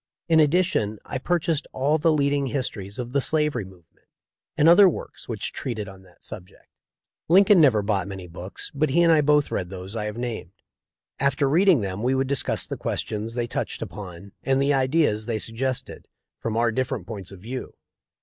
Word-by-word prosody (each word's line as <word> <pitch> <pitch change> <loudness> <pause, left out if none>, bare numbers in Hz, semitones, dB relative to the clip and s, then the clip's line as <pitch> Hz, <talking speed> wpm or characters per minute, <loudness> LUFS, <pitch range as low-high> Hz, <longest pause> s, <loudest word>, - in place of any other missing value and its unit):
In 165 -1 +4
addition 155 - +2
I 130 - -4
pur 175 +6 +1
chased 160 -2 -2
all 145 +4 +1
the 165 +2 +3
leading 140 -2 +1
histories 110 -7 -4
of 120 -1 -5
the 140 +1 +1
slavery 150 -7 0
move 90 -3 -16
ment, - - -36 0.5
and 150 - +4
other 185 +3 +8
works - - -8
which - - -3
treated 110 -6 -4
on 95 -1 -12
that 90 -2 -22
subject. 90 - -11 0.6
Lincoln 195 +3 +6
himself 145 -6 +6
never 105 - +1
bought 100 -3 0
many 95 -2 -7
books, 90 +3 -8
but 150 +1 +1
he 170 +6 +3
and 170 - +5
I 155 - +5
both 150 0 +3
read 90 - -2
those 95 +2 -8
I 105 -2 -2
have 105 +1 -5
named. 120 -7 -5 0.7
After 140 0 +2
read 175 +8 +4
ing 160 -11 +5
them 95 0 -4
we 130 +3 +1
would 135 0 +1
discuss 140 -1 0
the - - -5
questions 110 +2 -4
they 120 -1 0
touched - - -4
upon 100 -1 -9
and 135 0 +1
the 140 +1 +2
ideas 130 -5 +1
they 115 -2 -1
suggested, 125 +4 -4 0.3
from 115 -1 -3
our 115 0 +2
different 130 -4 -2
points 100 -4 -7
of 95 - -11
view. 125 +7 -7
125 Hz, 200 wpm, -24 LUFS, 105-145 Hz, 0.7 s, other